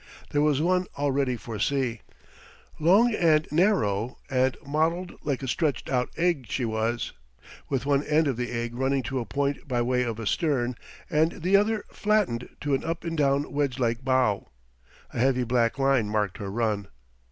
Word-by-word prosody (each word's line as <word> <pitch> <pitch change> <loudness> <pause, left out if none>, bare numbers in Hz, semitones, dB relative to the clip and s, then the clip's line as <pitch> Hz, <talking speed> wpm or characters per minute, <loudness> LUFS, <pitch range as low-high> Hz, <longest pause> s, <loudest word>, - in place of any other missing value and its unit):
There 145 - +2
was 150 -2 +3
one 180 +1 +2
all 145 0 0
ready 135 -2 +1
for 110 -1 -7
sea. 130 -5 0 0.8
Long 200 +9 +5
and 160 -5 +3
narrow, 125 - +1
and 130 0 +2
modelled 165 +5 0
like 140 -2 -2
a - - -3
stretched 145 +3 -1
out 125 -1 +1
egg 165 -7 +1
she 125 - -1
was, 110 +1 -1 0.6
with 135 -2 -1
one 140 -1 +3
end 155 +1 +3
of 135 - 0
the 120 0 -3
egg 120 0 -3
running 135 +2 0
to 130 +3 -2
a 115 - -5
point 140 +5 -2
by 120 -3 0
way 125 +1 +1
of 115 -3 -2
a 115 - -5
stern, 125 -2 0 0.3
and 160 +2 +1
the 185 +3 +3
other 210 +1 +2
flattened 205 - 0
to 145 -1 -1
an 135 - +1
up 165 +1 -3
and 165 -1 -3
down 140 -1 +1
wedge 140 -3 0
like 120 -1 0
bow. 130 -6 +1 0.6
A - - -4
heavy 130 0 +3
black 120 0 +1
line 135 -5 +2
marked 105 -3 -1
her 100 - -4
run. 105 -2 -1
135 Hz, 185 wpm, -26 LUFS, 120-155 Hz, 0.8 s, Long